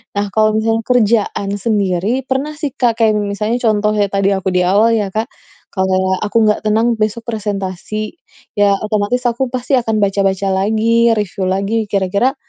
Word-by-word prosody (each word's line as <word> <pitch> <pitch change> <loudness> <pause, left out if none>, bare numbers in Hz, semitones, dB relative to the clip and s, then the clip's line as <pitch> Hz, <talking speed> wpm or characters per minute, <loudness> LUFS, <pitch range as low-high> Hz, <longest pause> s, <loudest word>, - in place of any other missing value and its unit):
Nah, 205 0 0
kalau 215 0 +4
misalnya 225 +1 0
kerjaan 220 -4 +1
sendiri, 205 +3 0
pernah 270 +3 -1
sih, 295 -2 -4
Kak, 235 -2 0
kayak 220 -2 +3
m 205 -1 -1
misalnya 210 +3 -1
contoh 215 -1 +2 0.2
tadi 195 0 +1
aku 190 0 -2
di 180 0 +2
awal 210 +5 +4
ya, 210 -3 0
Kak. 220 +1 -1 0.4
Kayak 190 -1 0
aku 210 - -1
gak - - -3
tenang 225 +2 +2
besok 215 +2 -1
presentasi, 210 - -4 0.4
ya 200 -1 +4
otomatis 215 +3 -1
aku 240 +3 -1
pasti 255 +2 0
akan 225 -2 -1
baca-baca 195 -1 0
lagi, 220 +4 +2
review 200 -2 -2
lagi 200 +4 -1
kira-kira, 200 +7 0
215 Hz, 165 wpm, -16 LUFS, 195-230 Hz, 0.4 s, kalau